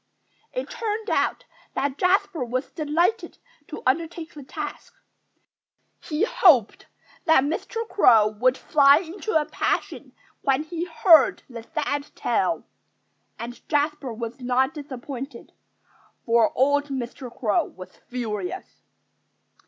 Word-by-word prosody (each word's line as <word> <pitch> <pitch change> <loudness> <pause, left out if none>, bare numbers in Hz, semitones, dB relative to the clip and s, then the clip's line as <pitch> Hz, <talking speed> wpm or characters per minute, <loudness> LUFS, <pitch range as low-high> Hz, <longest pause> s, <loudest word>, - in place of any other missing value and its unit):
It - - -4
turned 440 0 -3
out - - 0 0.3
that 280 0 -1
Jasper 370 -4 +2
was 255 +2 -3
delighted 335 +8 0 0.3
to 305 - -8
undertake 325 +4 -1
the 295 - -10
task. 295 +2 -7 1.0
He 310 +3 -2
hoped 310 - +4 0.4
that 320 -5 +5
Mr. 435 +9 -3
Crow 225 - +5
would 250 +5 +1
fly 280 -1 +5
into 350 +2 -1
a 300 - -2
passion - - -2 0.3
when 275 +1 +1
he 335 +2 -4
heard 325 -2 +5
the 235 -3 -8
sad 290 +1 -3
tale. - - 0 0.7
And 240 +1 -8
Jasper 295 -3 0
was 230 +2 -6
not 255 +3 +1
disappointed. 270 -3 -8 0.7
For 230 -1 +3
old 285 +2 +3
Mr. 255 -2 -5
Crow 225 -4 0
was 185 0 -12
furious. 250 - -5
285 Hz, 115 wpm, -24 LUFS, 250-330 Hz, 1.0 s, that